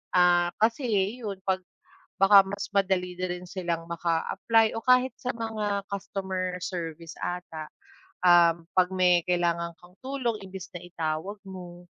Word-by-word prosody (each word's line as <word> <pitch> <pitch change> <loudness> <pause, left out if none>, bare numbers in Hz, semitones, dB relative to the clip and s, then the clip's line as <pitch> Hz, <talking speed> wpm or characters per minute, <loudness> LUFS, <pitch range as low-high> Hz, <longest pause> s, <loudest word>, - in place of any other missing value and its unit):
Ah, 175 -1 +5
kasi 230 +5 +2
ayun 205 0 -1
'pag 190 -1 +1 0.6
baka 195 0 +9
mas 200 +1 -5
madali 185 -2 +1
na 185 - -1
rin 180 0 -8
silang 170 -3 -3
maka-apply 175 +7 +1
o - - -3
kahit 255 +1 +5
sa 255 -1 -2
mga 210 -3 -2
customer 190 -2 -3
service 170 -2 -5
ata. 165 -3 -5 0.6
Um, 170 -1 +5
'pag 185 -1 +4
may 180 -2 +4
kailangan 170 -1 0
kang 175 0 -18
tulong 260 -5 -2
imbis 190 -1 -8
na 175 - -6
itawag 170 +3 -3
mo, 180 -2 -9
185 Hz, 140 wpm, -27 LUFS, 175-200 Hz, 0.6 s, baka